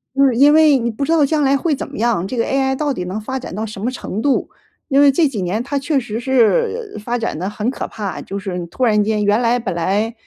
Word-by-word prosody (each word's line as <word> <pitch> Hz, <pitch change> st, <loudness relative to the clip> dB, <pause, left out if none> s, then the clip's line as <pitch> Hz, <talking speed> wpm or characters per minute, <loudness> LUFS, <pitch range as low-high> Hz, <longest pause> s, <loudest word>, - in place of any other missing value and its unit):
就 275 Hz, -, +4 dB
是 260 Hz, -3 st, +2 dB
因 285 Hz, +4 st, +6 dB
为 310 Hz, -3 st, +6 dB
你 235 Hz, -1 st, -1 dB
不 225 Hz, +6 st, -4 dB
知 275 Hz, -, -1 dB
道 320 Hz, -3 st, +4 dB
将 305 Hz, +2 st, 0 dB
来 275 Hz, 0 st, +3 dB
会 315 Hz, +2 st, 0 dB
怎 -, -, -6 dB
么 -, -, -9 dB
样， 220 Hz, -5 st, 0 dB
这 250 Hz, -, -5 dB
个 230 Hz, -, +2 dB
AI 265 Hz, 0 st, 0 dB
到 290 Hz, 0 st, -1 dB
底 180 Hz, -, -4 dB
能 185 Hz, +4 st, -4 dB
发 260 Hz, +5 st, -4 dB
展 250 Hz, -, -8 dB
到 215 Hz, +2 st, -3 dB
什 210 Hz, -2 st, -8 dB
么 235 Hz, -, 0 dB
程 220 Hz, -5 st, -5 dB
度。 275 Hz, +1 st, +1 dB, 0.4 s
因 275 Hz, 0 st, +4 dB
为 285 Hz, -1 st, +7 dB
这 310 Hz, +3 st, +3 dB
几 235 Hz, -8 st, -4 dB
年 190 Hz, +6 st, -2 dB
它 280 Hz, +2 st, -2 dB
确 280 Hz, +1 st, 0 dB
实 225 Hz, -3 st, -5 dB
是 405 Hz, -, +1 dB
发 240 Hz, +2 st, -1 dB
展 230 Hz, -9 st, -3 dB
得 185 Hz, +3 st, -2 dB
很 210 Hz, +1 st, -4 dB
可 -, -, -5 dB
怕， 205 Hz, -4 st, -5 dB
就 195 Hz, -, -6 dB
是 190 Hz, -3 st, -4 dB
突 255 Hz, -, -4 dB
然 210 Hz, -3 st, +3 dB
间 210 Hz, 0 st, 0 dB
原 205 Hz, +3 st, +2 dB
来 240 Hz, 0 st, +2 dB
本 225 Hz, -6 st, -3 dB
来， 200 Hz, +7 st, -1 dB
240 Hz, 305 characters per minute, -18 LUFS, 210-275 Hz, 0.4 s, 为